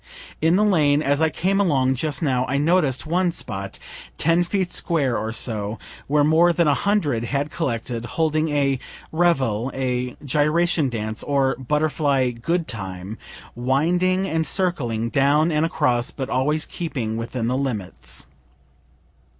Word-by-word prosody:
In 165 Hz, +2 st, +4 dB
the 205 Hz, -, +3 dB
lane 155 Hz, -7 st, +3 dB
as 145 Hz, +1 st, +1 dB
I 160 Hz, -, +4 dB
came 190 Hz, +5 st, 0 dB
along 135 Hz, -8 st, +2 dB
just 145 Hz, +3 st, -2 dB
now 130 Hz, -4 st, +1 dB
I 140 Hz, -, 0 dB
noticed 150 Hz, -3 st, +2 dB
one 175 Hz, +3 st, +1 dB
spot, 100 Hz, -, -5 dB, 0.4 s
ten 165 Hz, +2 st, +3 dB
feet 185 Hz, 0 st, -2 dB
square 140 Hz, -8 st, +1 dB
or 110 Hz, +1 st, -2 dB
so, 110 Hz, -2 st, -3 dB, 0.3 s
where 145 Hz, +1 st, +3 dB
more 160 Hz, +3 st, +5 dB
than 170 Hz, -1 st, +2 dB
a 145 Hz, -, +4 dB
hundred 145 Hz, -, 0 dB
had 140 Hz, +4 st, -2 dB
collected, 120 Hz, -6 st, -3 dB
holding 155 Hz, +3 st, 0 dB
a 140 Hz, -3 st, +1 dB, 0.3 s
revel, 135 Hz, -9 st, +1 dB
a 125 Hz, -1 st, -2 dB
gyration 150 Hz, +2 st, +2 dB
dance, 110 Hz, -2 st, -3 dB
or 140 Hz, -2 st, +1 dB
butterfly 140 Hz, -1 st, +1 dB
good 165 Hz, +9 st, -2 dB
time, 95 Hz, -1 st, -5 dB, 0.3 s
winding 175 Hz, +10 st, +1 dB
and 160 Hz, -2 st, 0 dB
circling, 120 Hz, -, 0 dB
down 145 Hz, +4 st, +3 dB
and 155 Hz, +1 st, +2 dB
across, 125 Hz, -7 st, +1 dB
but 135 Hz, 0 st, -5 dB
always 150 Hz, +4 st, +1 dB
keeping 130 Hz, -10 st, -4 dB
within 115 Hz, +1 st, -3 dB
the 125 Hz, +2 st, 0 dB
limits. 125 Hz, -9 st, -4 dB
140 Hz, 145 wpm, -22 LUFS, 125-165 Hz, 0.4 s, more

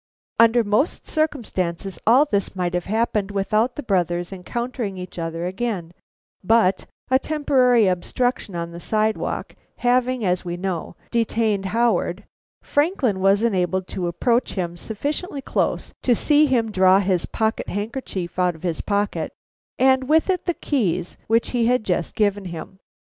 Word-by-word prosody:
Under 230 Hz, +1 st, +6 dB
most 215 Hz, +9 st, 0 dB
circumstances 200 Hz, -, -2 dB
all 255 Hz, +6 st, +6 dB
this 200 Hz, -8 st, -1 dB
might 180 Hz, -1 st, -1 dB
have 175 Hz, -1 st, -1 dB
happened 215 Hz, -1 st, 0 dB
without 215 Hz, +4 st, 0 dB
the 295 Hz, -, -5 dB
brothers 175 Hz, -3 st, 0 dB
encountering 225 Hz, +2 st, -4 dB
each 180 Hz, -1 st, -7 dB
other 165 Hz, +1 st, -3 dB
again, 190 Hz, -3 st, -3 dB, 0.5 s
but 195 Hz, -2 st, +3 dB, 0.2 s
a 260 Hz, -, +5 dB
temporary 260 Hz, -7 st, +3 dB
obstruction 195 Hz, +3 st, -1 dB
on 170 Hz, 0 st, -4 dB
the 170 Hz, -, -8 dB
sidewalk 215 Hz, +3 st, -1 dB, 0.2 s
having, 250 Hz, -1 st, +1 dB
as 180 Hz, -1 st, +1 dB
we 175 Hz, -1 st, -4 dB
know, 185 Hz, -2 st, -4 dB, 0.2 s
detained 220 Hz, -3 st, +1 dB
Howard, 210 Hz, -2 st, +1 dB, 0.4 s
Franklin 290 Hz, -, +1 dB
was 195 Hz, +3 st, +3 dB
enabled 190 Hz, -4 st, +1 dB
to 180 Hz, -2 st, -3 dB
approach 235 Hz, +8 st, +1 dB
him 175 Hz, -3 st, -3 dB
sufficiently 285 Hz, -, -4 dB
close 270 Hz, -, -1 dB
to 245 Hz, -, +3 dB
see 300 Hz, +5 st, +4 dB
him 235 Hz, -5 st, +1 dB
draw 185 Hz, -1 st, +5 dB
his 185 Hz, -3 st, 0 dB
pocket 220 Hz, -1 st, -1 dB
handkerchief 205 Hz, -4 st, -4 dB
out 180 Hz, -2 st, +2 dB
of 160 Hz, -, -16 dB
his 170 Hz, -3 st, -1 dB
pocket, 205 Hz, 0 st, -1 dB, 0.5 s
and 260 Hz, 0 st, +3 dB
with 320 Hz, +4 st, +4 dB
it 365 Hz, -, -2 dB
the 345 Hz, -, +1 dB
keys 185 Hz, -, -1 dB
which 230 Hz, +1 st, +2 dB
he 235 Hz, -2 st, +2 dB
had 250 Hz, -2 st, +2 dB
just 175 Hz, -4 st, -1 dB
given 205 Hz, -2 st, +1 dB
him. 175 Hz, +2 st, -8 dB
210 Hz, 150 wpm, -22 LUFS, 185-245 Hz, 0.5 s, Under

